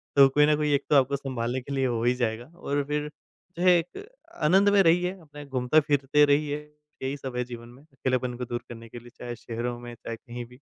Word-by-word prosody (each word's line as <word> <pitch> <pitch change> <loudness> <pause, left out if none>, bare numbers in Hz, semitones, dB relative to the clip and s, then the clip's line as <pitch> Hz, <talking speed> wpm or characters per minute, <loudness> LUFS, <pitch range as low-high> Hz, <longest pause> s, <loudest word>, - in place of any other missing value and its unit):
तो 140 -1 +8
कोई 150 +2 +4
न 150 0 +4
कोई 150 -1 +1
एक 140 - +2
तो, 150 - +4
आपको 140 +1 +4
सँभालने 130 -2 -3
के 140 +2 -7
लिए 135 -1 +1
हो 115 -2 -1
ही 120 +1 +3
जाएगा 120 -1 -2
और 145 -3 -1
फिर 150 0 -2 0.5
जो 175 - -2
है 185 - +7
एक 180 - -5 0.4
आनंद 190 +6 +5
में 200 -1 +5
रहिए 180 +2 +3
अपना 150 -2 -11
घूमता-फिरते 140 +2 +3
रहिए, 145 0 +1 0.5
यही 135 +2 -2
सब 130 -2 -7
है 125 - +1
जीवन 120 -1 -9
में 130 +4 -16
अकेलेपन 130 -4 -2
को 125 - -4
दूर 120 0 -4
करने 115 -1 -10
के 120 - -9
लिए, 120 +1 -14
चाहे 120 -1 -5
शहरों 120 +1 -4
में, 120 0 -9
चाहे 115 - -6
कहीं 120 +1 -8
भी। 125 +2 -17
135 Hz, 230 wpm, -27 LUFS, 120-150 Hz, 0.5 s, तो